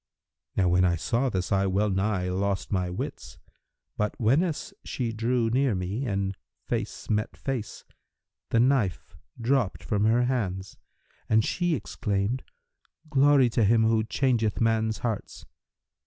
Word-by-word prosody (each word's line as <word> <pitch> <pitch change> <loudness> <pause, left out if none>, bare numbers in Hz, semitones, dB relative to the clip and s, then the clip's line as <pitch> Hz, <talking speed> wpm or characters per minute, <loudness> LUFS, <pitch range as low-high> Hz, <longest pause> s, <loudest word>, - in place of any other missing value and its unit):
Now 95 - +2
when 90 +1 +3
I 85 -1 +3
saw 115 +11 0
this, 95 -3 -2
I 95 -1 +2
well 100 +2 +1
nigh 95 -1 0
lost 95 +1 -1
my 90 -3 0
wits; 90 - -6 0.6
but, 105 0 -2
whenas 150 +8 +1
she 120 -3 -3
drew 115 +1 0
near 130 -2 +2
me 95 +9 -3
and 100 -2 -1 0.3
face - - -3
met 105 0 -1
face, 130 -6 -4 0.7
the 115 - +2
knife 120 -7 +1 0.2
dropped 120 -3 0
from 105 0 0
her 115 +3 +4
hand, 95 -7 -2 0.5
and 110 0 +4
she 175 -2 0
exclaimed, 105 -1 -2 0.7
'Glory 140 -1 +5
to 115 - +2
Him 110 +2 +4
who 110 0 +3
changeth 115 -2 0
men's 110 -1 +1
hearts!' 110 -4 -4
110 Hz, 140 wpm, -27 LUFS, 95-125 Hz, 0.7 s, Glory